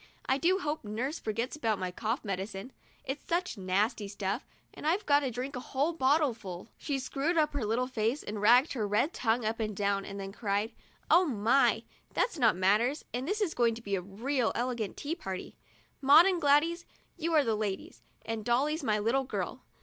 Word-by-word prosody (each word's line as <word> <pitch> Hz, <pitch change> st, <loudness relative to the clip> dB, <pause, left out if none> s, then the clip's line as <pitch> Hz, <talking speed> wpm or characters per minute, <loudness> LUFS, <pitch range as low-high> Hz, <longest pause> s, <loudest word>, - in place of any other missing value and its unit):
I 265 Hz, +1 st, +1 dB
do 365 Hz, +6 st, +3 dB
hope 310 Hz, -4 st, -3 dB
nurse 240 Hz, +9 st, -3 dB
forgets 230 Hz, +5 st, -2 dB
about 225 Hz, -8 st, 0 dB
my 185 Hz, -1 st, -3 dB
cough 225 Hz, +6 st, -3 dB
medicine. 195 Hz, +4 st, -4 dB, 0.3 s
It's 270 Hz, +2 st, -4 dB
such 355 Hz, -2 st, -1 dB
nasty 205 Hz, +3 st, 0 dB
stuff, 200 Hz, +3 st, -3 dB, 0.3 s
and -, -, -6 dB
I've 365 Hz, +6 st, +1 dB
got 285 Hz, -1 st, +5 dB
to 275 Hz, -3 st, -2 dB
drink 250 Hz, +4 st, -4 dB
the 250 Hz, -, -4 dB
whole 280 Hz, +6 st, -1 dB
bottleful." 260 Hz, -, 0 dB
She 285 Hz, -3 st, -2 dB
screwed 275 Hz, +5 st, -1 dB
up 305 Hz, -2 st, +2 dB
her 285 Hz, -4 st, -2 dB
little 225 Hz, +4 st, +1 dB
face, 245 Hz, +2 st, -1 dB
and 210 Hz, 0 st, -5 dB
wagged 245 Hz, +7 st, +5 dB
her 220 Hz, -6 st, -1 dB
red 210 Hz, +11 st, +1 dB
tongue 230 Hz, 0 st, 0 dB
up 220 Hz, +1 st, -1 dB
and 215 Hz, -2 st, -2 dB
down, 200 Hz, -1 st, +1 dB
and 200 Hz, 0 st, -7 dB
then 195 Hz, 0 st, -5 dB
cried: 205 Hz, +1 st, -1 dB, 0.4 s
"Oh 360 Hz, +2 st, +7 dB
my, 245 Hz, 0 st, +3 dB, 0.3 s
that's 350 Hz, -10 st, 0 dB
not 225 Hz, -7 st, +4 dB
manners, 210 Hz, -, +2 dB
and 250 Hz, +3 st, -2 dB
this 420 Hz, +4 st, -1 dB
is 375 Hz, -6 st, +1 dB
going 235 Hz, -2 st, +2 dB
to 230 Hz, -, -9 dB
be 200 Hz, -, -4 dB
a 190 Hz, -, +1 dB
real 230 Hz, +7 st, -1 dB
elegant 240 Hz, -4 st, -2 dB
tea 295 Hz, +3 st, -3 dB
party! 190 Hz, -, -6 dB, 0.5 s
Maud 290 Hz, +5 st, +8 dB
and 370 Hz, -3 st, +1 dB
Gladys, 320 Hz, +4 st, +3 dB, 0.3 s
you 335 Hz, -1 st, -1 dB
and 295 Hz, -4 st, +4 dB
I -, -, +3 dB
are -, -, +1 dB
ladies, 205 Hz, -3 st, -4 dB, 0.2 s
and 225 Hz, -1 st, -3 dB
Dolly's 280 Hz, +7 st, +1 dB
my 215 Hz, -5 st, +2 dB
little 235 Hz, +6 st, +1 dB
girl. -, -, -4 dB
240 Hz, 205 wpm, -30 LUFS, 210-290 Hz, 0.5 s, Maud